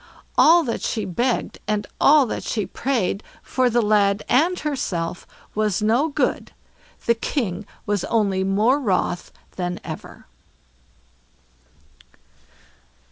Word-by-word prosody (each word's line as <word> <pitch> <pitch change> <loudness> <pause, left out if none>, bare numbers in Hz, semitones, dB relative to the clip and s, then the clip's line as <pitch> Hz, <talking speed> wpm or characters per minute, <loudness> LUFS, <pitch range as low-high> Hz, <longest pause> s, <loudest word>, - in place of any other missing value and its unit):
All 335 +1 +6
that 235 -6 -3
she 220 - -2
begged, 240 +7 -1
and 210 -1 0 0.2
all 295 -1 +6
that 225 - -4
she 215 -3 -2
prayed, 230 -7 -1 0.2
for 255 -1 +1
the 240 0 +2
lad 205 -1 +2
and 335 +8 +3
herself, 180 - -3 0.3
was 210 -1 0
no 235 +8 +3
good. 290 - -1 0.5
The 235 - +4
King 215 - -3 0.2
was 205 -3 0
only 200 -4 +1
more 210 +8 +2
wroth 185 -7 -1 0.3
than 180 -1 -3
ever. - - -9
215 Hz, 115 wpm, -22 LUFS, 195-255 Hz, 0.5 s, All